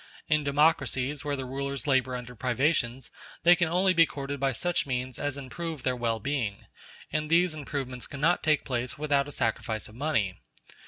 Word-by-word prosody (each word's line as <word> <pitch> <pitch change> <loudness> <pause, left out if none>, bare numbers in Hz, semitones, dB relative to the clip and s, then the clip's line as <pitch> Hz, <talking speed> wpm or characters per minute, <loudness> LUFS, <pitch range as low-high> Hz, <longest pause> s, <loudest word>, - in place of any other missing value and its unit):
In 150 -1 +2
democracies, 145 -2 +2
where 145 -1 -1
the 135 -1 -4
rulers 140 +2 -3
labor 130 -3 +2
under 125 0 -7
privations, 125 0 0 0.3
they 175 +1 +8
can 170 -2 +1
only 185 +3 +3
be 165 -2 +6
courted 140 0 -5
by 135 0 +2
such 175 +5 0
means 125 -1 -3
as 145 -1 -2
improve 150 +2 -5
their 130 -1 +1
well 115 -2 -1
being, 115 -5 -2 0.5
and 155 0 -1
these 170 0 +4
improvements 135 -4 -5
cannot 155 +5 +1
take 155 -1 +2
place 125 -2 -2
without 145 -2 +1
a - - -7
sacrifice 115 -3 -1
of 110 - -14
money. 115 -8 0
140 Hz, 175 wpm, -28 LUFS, 125-155 Hz, 0.5 s, they